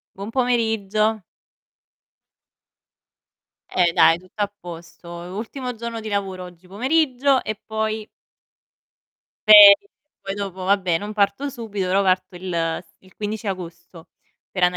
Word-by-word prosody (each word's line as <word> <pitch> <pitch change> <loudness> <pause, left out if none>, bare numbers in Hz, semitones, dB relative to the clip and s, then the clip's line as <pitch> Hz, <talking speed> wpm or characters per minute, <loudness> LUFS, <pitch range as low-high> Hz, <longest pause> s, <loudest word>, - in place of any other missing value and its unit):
Buon 200 +3 -7
pomeriggio. 220 -4 0 2.5
Eh, 175 -2 +2
dai 165 0 +5
tutto 185 +4 -7
a 205 - -1
posto. 170 0 -10
E - - -9
ultimo 240 +6 -6
giorno 230 0 -6
di 220 - -7
lavoro 195 -3 -3
oggi 180 0 -14
pomeriggio 260 - +1
e 215 -1 -5
poi 220 0 -3 1.4
ferie. 210 - +9 0.3
Poi 195 0 -5
dopo 195 -2 -6
vabbè 185 -3 +1
non 210 +3 -7
parto 210 +7 0
subito, 220 -7 -5
però 190 +2 +2
parto 185 -1 0
il 180 +1 -6 0.3
s - - -30
il 185 -1 -23
15 215 +1 -5
agosto 170 -2 -7 0.4
per 185 -2 +1
anda 180 0 +1
200 Hz, 130 wpm, -22 LUFS, 185-220 Hz, 2.5 s, ferie